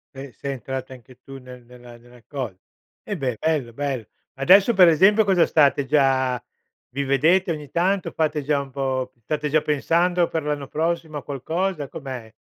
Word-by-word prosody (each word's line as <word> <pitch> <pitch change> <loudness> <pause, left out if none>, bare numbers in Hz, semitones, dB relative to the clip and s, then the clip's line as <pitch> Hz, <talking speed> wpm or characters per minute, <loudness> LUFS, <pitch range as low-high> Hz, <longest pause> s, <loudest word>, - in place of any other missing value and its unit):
Beh, 135 0 -8
sei 140 +6 -5
entrata 130 +1 -6
anche 125 0 -16
tu 135 -1 -11
nel 125 -1 -12
nella 120 0 -14
nella 120 0 -19
cosa. 125 -10 -5 0.5
Eh, 205 - -4
beh, 130 - -3
bello, 150 -7 -1
bello. 135 -4 -3 0.3
Adesso, 190 - +5
per 185 -4 +7
esempio, 190 +7 +5
cosa 190 -4 +3
state 140 -2 +3
già 130 -3 +1 0.5
vi 140 +3 -3
vedete 160 +7 +2
ogni 150 -3 -6
tanto? 185 +3 0
Fate 155 -2 -1
già 145 0 +1
un 140 -1 -7
po' 130 -1 -2
state 150 +5 -3
già 155 +1 +3
pensando 170 +4 +1
per 160 - -2
l'anno 145 -2 -3
prossimo 160 -1 -2
a - - -7
qualcosa? 160 +3 -3
Com'è 130 -6 -8
140 Hz, 175 wpm, -23 LUFS, 130-160 Hz, 0.5 s, per